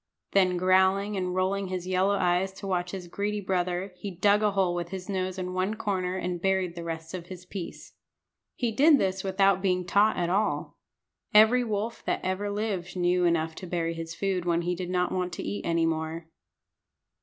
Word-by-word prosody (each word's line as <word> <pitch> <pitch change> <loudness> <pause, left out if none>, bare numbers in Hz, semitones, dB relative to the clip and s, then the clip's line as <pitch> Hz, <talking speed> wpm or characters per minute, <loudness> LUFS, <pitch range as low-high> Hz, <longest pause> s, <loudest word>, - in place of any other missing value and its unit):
Then, 185 -2 +3
growling 190 +3 +3
and 185 -1 -2
rolling 190 +1 0
his 185 -1 -4
yellow 185 +2 +2
eyes 180 0 +1
to 195 - -9
watch 180 -2 -1
his 180 -1 -6
greedy 205 +4 -2
brother, 185 0 -1
he 200 - -5
dug 200 +3 +3
a 210 - +3
hole 190 -3 +2
with 175 -1 -3
his 185 -1 -6
nose 185 -2 -2
in 180 -1 -4
one 185 +4 0
corner 185 -4 -2
and 180 -1 -3
buried 190 -2 +1
the 170 -1 -7
rest 165 0 -6
of 175 -2 -6
his 180 -1 -9
piece. 180 -2 -8 0.6
He 240 -2 -1
did 290 +6 +6
this 190 -4 -1
without 195 0 +3
being 180 -2 +1
taught 205 +4 +3
at 175 - 0
all. 205 +3 -1 0.6
Every 220 +4 +7
wolf 220 0 -3
that - - -1
ever 190 +2 -1
lived 200 -4 -3
knew 180 0 +2
enough 165 -1 +1
to 185 - -7
bury 165 -1 -1
his 165 0 -6
food 190 -2 -1
when 170 -1 +1
he 175 +1 0
did 180 0 -5
not 180 0 0
want 180 -1 -2
to - - -5
eat 100 0 -4
any 165 -1 +2
more. 160 0 -2
185 Hz, 200 wpm, -27 LUFS, 175-195 Hz, 0.6 s, Every